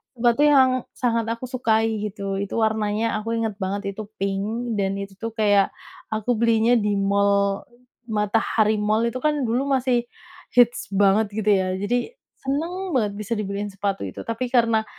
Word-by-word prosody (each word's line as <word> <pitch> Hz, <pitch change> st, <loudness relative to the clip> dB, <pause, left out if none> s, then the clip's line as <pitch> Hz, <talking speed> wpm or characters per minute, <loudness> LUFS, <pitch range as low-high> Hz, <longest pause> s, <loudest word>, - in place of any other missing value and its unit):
Sepatu 240 Hz, +2 st, +2 dB
yang 270 Hz, -3 st, +6 dB, 0.3 s
sangat 230 Hz, -2 st, 0 dB
aku 230 Hz, +2 st, -4 dB
sukai 225 Hz, -3 st, 0 dB
gitu, 200 Hz, -1 st, -4 dB
itu 200 Hz, 0 st, -4 dB
warnanya 220 Hz, 0 st, 0 dB
aku 225 Hz, +2 st, -3 dB
inget 225 Hz, -3 st, -2 dB
banget 200 Hz, +1 st, -2 dB
itu 210 Hz, +1 st, -8 dB
pink 205 Hz, +5 st, -2 dB
dan 195 Hz, 0 st, 0 dB
itu 200 Hz, 0 st, -5 dB
tuh 230 Hz, 0 st, -4 dB
kayak 205 Hz, -3 st, +3 dB, 0.4 s
aku 220 Hz, +2 st, 0 dB
belinya 230 Hz, 0 st, +3 dB
di 205 Hz, -1 st, 0 dB
mall, 200 Hz, 0 st, +1 dB, 0.4 s
Matahari 215 Hz, 0 st, +1 dB
Mall 215 Hz, +3 st, +1 dB
itu 255 Hz, -, -5 dB
kan 305 Hz, +3 st, +1 dB
dulu 245 Hz, +3 st, 0 dB
masih 255 Hz, -3 st, +1 dB, 0.5 s
hits 245 Hz, -1 st, +4 dB
banget 200 Hz, +2 st, +4 dB
gitu 215 Hz, -1 st, 0 dB
ya, 185 Hz, -2 st, +2 dB
jadi 245 Hz, -, -1 dB, 0.3 s
seneng 335 Hz, +7 st, -3 dB
banget 215 Hz, -5 st, +1 dB
bisa 215 Hz, +2 st, -3 dB
dibeliin 205 Hz, -1 st, -3 dB
sepatu 195 Hz, -, -2 dB
itu 95 Hz, -, -8 dB
tapi 230 Hz, +2 st, -3 dB
karena 230 Hz, -3 st, +3 dB
220 Hz, 160 wpm, -23 LUFS, 200-235 Hz, 0.5 s, yang